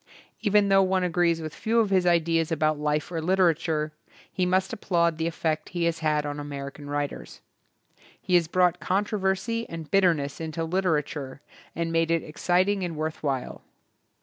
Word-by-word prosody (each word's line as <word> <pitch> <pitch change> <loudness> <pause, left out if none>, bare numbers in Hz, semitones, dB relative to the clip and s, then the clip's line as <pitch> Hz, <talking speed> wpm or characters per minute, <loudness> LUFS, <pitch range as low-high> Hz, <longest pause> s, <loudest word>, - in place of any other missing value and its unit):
Even 205 -2 +3
though 195 0 +6
one 190 -1 +1
agrees 170 -1 +1
with 155 0 -6
few 230 +1 0
of 215 -3 +1
his 185 -2 +3
ideas 165 -1 +2
about 155 -1 +1
life 150 +2 -1
or 165 -2 -2
literature, 160 -3 +1 0.4
he 180 -1 0
must 185 +3 +1
applaud 170 -6 0
the 160 - 0
effect 160 -2 -2
he 170 - 0
has 170 -1 0
had 150 -2 +1
on 145 0 -4
American 145 0 -7
writers. 145 0 -4 0.8
He 180 - -4
has 175 -2 +4
brought 180 0 +2
controversy 200 +3 -1
and 165 -2 -7
bit 195 0 +4
terness 150 -5 +1
into 160 0 -3
literature 155 -6 -1 0.4
and 165 0 -2
made 165 0 +1
it 165 -1 +1
ex 150 - -11
citing 185 +2 +2
and 170 -2 -3
worth 155 0 -3
while. 135 -4 -3
165 Hz, 175 wpm, -26 LUFS, 155-185 Hz, 0.8 s, though